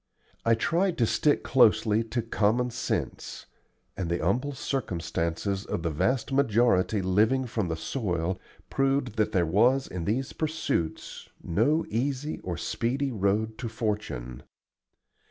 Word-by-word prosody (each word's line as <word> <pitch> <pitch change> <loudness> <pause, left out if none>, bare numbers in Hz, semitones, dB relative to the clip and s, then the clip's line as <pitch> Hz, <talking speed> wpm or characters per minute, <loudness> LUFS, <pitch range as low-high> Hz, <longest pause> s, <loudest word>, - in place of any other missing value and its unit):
I 115 0 +4
tried 170 +9 +1
to 120 - +3
stick 145 +6 +2
closely 110 -3 +4
to 115 +1 -2
common 115 +3 +1
sense; - - -3 0.5
and 90 -3 -3
the 85 - +1
humble 125 - 0
circumstances 95 - -2
of 85 - -4
the 85 - 0
vast 125 - 0
majority 115 -6 +3
living 110 +8 +2
from 110 -5 -2
the 80 - -2
soil 90 -1 -2 0.3
proved 135 -4 +1
that 110 - +2
there 90 -2 +2
was 120 +11 +3
in 90 -2 -5
these 130 - -1
pursuits 155 - -3
no 140 - +2
easy 135 +6 -2
or 85 -2 -4
speedy 130 +9 -1
road 110 +1 0
to 120 -2 -3
fortune. 105 - -3
110 Hz, 135 wpm, -27 LUFS, 95-130 Hz, 0.5 s, I